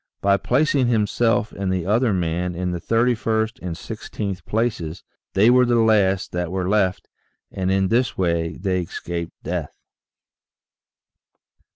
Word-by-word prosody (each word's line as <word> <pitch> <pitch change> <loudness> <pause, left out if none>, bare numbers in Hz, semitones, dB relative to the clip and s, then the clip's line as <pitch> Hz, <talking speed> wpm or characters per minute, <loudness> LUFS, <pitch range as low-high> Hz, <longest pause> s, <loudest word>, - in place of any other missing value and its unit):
By 100 0 +3
placing 140 +1 +2
himself 115 -1 +1
and 95 -1 -3
the 90 -3 -1
other 115 +4 +2
man 90 -1 -1
in 90 +1 -2
the 85 -1 -4
3ist 115 0 +1
and 90 -2 -4
i6th 100 0 -6
places, 100 -7 -2 0.3
they 105 +5 +6
were 125 0 +6
the 120 -1 +2
last 105 -4 +3
that 90 -1 -2
were 95 -1 -2
left, 95 -2 +1 0.4
and 95 -1 -2
in 95 0 +2
this 120 +2 +1
way 85 -2 0
they 90 -1 -1
escaped 85 -1 -5
death. - - -4
100 Hz, 140 wpm, -22 LUFS, 90-115 Hz, 0.4 s, they